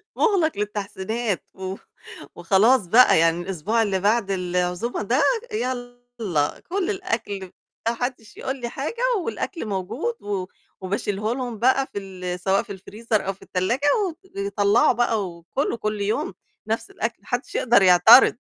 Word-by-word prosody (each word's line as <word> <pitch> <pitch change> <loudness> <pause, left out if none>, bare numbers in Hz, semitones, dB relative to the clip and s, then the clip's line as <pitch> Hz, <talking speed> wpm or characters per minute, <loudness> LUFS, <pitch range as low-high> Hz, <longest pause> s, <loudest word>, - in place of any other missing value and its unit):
مُغلق 380 -8 +2
للتحسينات، 210 +1 -3
و 190 0 -5 0.6
وخلاص 215 +1 +3
بقى 235 0 +6
يعني 165 +1 +3
الأسبوع 195 +5 -1
اللي 200 -3 0
بعد 205 +1 +1
العزومة 180 +4 -1
ده 230 +5 +1 0.3
يالّا 245 - -3
كُل 380 +1 -1
الأكل، 205 - -3 0.4
ما - - 0
حدش 245 -2 -5
يقول 265 - -3
لي 240 - -3
حاجة، 310 - -4 0.2
والأكل 370 - -4
موجود، 215 - -3
و 200 -3 -2 0.4
وباشيله 205 +3 -2
لهم 245 -4 -5
بقى 260 +3 +3
في - - -2
ال 185 -2 -6
سواء 195 +2 +1
في 200 -4 -8
الfreezer 215 +3 -2
أو 195 - -3
في 195 - -26
التلاجة، 235 +10 -1 0.6
وطلّعوا 200 +4 +3
بقى 225 -5 0
وكلوا 170 - -3
كلّ 215 -2 -3
يوم 200 -1 -1 0.3
نفس 225 +1 -2
الأكل، 230 +2 -3
ما 205 - -23
حدش 245 +1 -3
يقدر 235 -4 +4
يعترض. 205 +8 +7
215 Hz, 145 wpm, -23 LUFS, 190-245 Hz, 0.6 s, يعترض